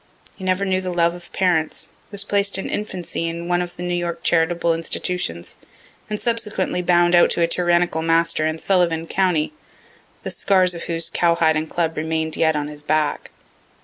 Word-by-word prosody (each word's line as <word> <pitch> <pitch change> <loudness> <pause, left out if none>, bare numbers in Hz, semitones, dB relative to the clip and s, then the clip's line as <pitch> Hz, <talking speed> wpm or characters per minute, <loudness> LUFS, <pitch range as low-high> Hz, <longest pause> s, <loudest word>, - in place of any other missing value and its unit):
He 190 - -11
never 185 +1 +1
knew 185 -1 0
the 185 -1 -3
love 170 -1 +2
of 175 -1 -13
parents, 175 -4 0 0.2
was 205 -2 -1
placed 200 -1 +1
in 195 - -4
infancy 185 -5 -3
in 170 +1 -5
one 175 0 +1
of 175 0 -6
the 175 - -7
New 175 0 -2
York 170 -1 -3
charitable 170 0 +2
institutions, 165 - -3 0.5
and 210 -1 -3
subsequently 225 -6 -1
bound 175 0 +3
out 175 - +6
to - - -1
a 170 - +4
tyrannical 175 -1 +1
master 165 -1 +2
in 155 0 -2
Sullivan 170 -2 +1
county, 180 - 0 0.7
(the - - -3
scars 185 -2 +3
of 170 - -7
whose 165 0 -1
cowhide 170 -2 +2
and 155 +1 -2
club 165 -2 -1
remain'd 160 0 -1
yet 160 -1 +2
on 145 -1 -2
his 150 0 -8
back.) 150 0 0
170 Hz, 180 wpm, -21 LUFS, 160-180 Hz, 0.7 s, out